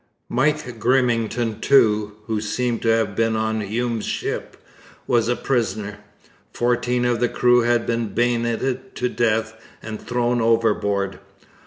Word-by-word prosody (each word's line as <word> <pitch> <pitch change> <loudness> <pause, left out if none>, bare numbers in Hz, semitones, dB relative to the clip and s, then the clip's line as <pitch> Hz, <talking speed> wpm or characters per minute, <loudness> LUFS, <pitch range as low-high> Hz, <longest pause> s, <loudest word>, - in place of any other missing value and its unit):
Mike 130 -2 0
Grimmington 115 -2 +1
too, 105 -6 +3
who 110 -2 -2
seems 120 +2 -1
to - - -2
have 115 -3 +2
been 115 +1 +1
on 110 0 -1
Hume's 115 +2 -2
ship, - - -4 0.5
was 115 -2 +2
a 120 - +1
prisoner. 110 -6 -2 0.5
Fourteen 120 0 0
of 120 -1 +1
the 120 - +2
crew 125 0 +4
had 120 -1 +1
been 115 -1 -1
bayoneted 120 +3 -1
to 125 - -1
death 115 -2 0 0.3
and 110 -1 -7
thrown 120 0 0
overboard. 105 -4 +1
115 Hz, 135 wpm, -22 LUFS, 110-120 Hz, 0.5 s, crew